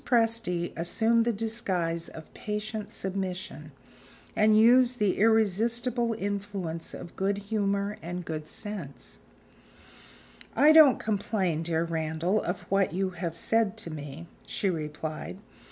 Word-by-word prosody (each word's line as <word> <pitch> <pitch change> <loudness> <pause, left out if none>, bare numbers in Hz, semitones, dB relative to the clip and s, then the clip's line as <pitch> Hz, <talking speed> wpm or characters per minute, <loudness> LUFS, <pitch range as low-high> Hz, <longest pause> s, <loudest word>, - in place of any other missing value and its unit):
Presty 225 -8 +1
assumed 225 +7 +2
the 240 - +2
disguise 190 -7 -2
of 160 - -12
patient 210 0 -4
submission, 190 0 -5 0.6
and 215 0 +5
used 245 +2 +5
the 205 -4 +1
irresistible 225 +3 +2
influence 200 -5 -4
of 170 - -10
good 195 +1 0
humor 200 0 -1
and 175 +1 -5
good 155 -1 -5
sense. 195 -10 -8 1.4
"I 300 +2 +7
don't 310 -4 +8
complain, 195 -6 -1
dear 165 0 0
Randal, 165 +4 -1
of 180 +1 -3
what 195 -4 +1
you 190 +1 -1
have 170 -2 -5
said 225 +1 +1
to 165 - -5
me," 150 +1 -7 0.2
she 195 - 0
replied. 155 +1 -5
195 Hz, 120 wpm, -28 LUFS, 170-220 Hz, 1.4 s, don't